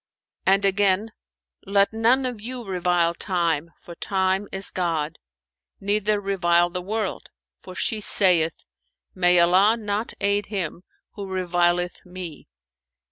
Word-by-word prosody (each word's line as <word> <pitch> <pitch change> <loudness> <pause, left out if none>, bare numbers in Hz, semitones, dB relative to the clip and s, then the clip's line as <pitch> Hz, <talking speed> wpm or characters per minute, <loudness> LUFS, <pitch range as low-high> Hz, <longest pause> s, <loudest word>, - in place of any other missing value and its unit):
And 195 +1 +4
again, 200 +2 +2 0.6
'Let 200 +1 +3
none 235 +4 +3
of 245 -4 -4
you 245 +2 -6
revile 180 -3 +1
Time, 170 -3 -1
for 170 - -11
Time 190 +2 0
is 195 +1 -5
God; 165 -4 -2 0.6
neither 210 +1 0
revile 175 -3 +2
the 180 0 -3
world, 210 +2 -3 0.3
for 185 - -11
she 215 +2 -1
saith, 175 -6 +3 0.5
'May 180 -1 +3
Allah 190 +6 +5
not 210 0 -3
aid 200 0 +1
him 190 -5 -4 0.3
who 200 -2 -7
revileth 175 -1 0
me! 180 -4 -9
190 Hz, 125 wpm, -24 LUFS, 175-205 Hz, 0.6 s, Allah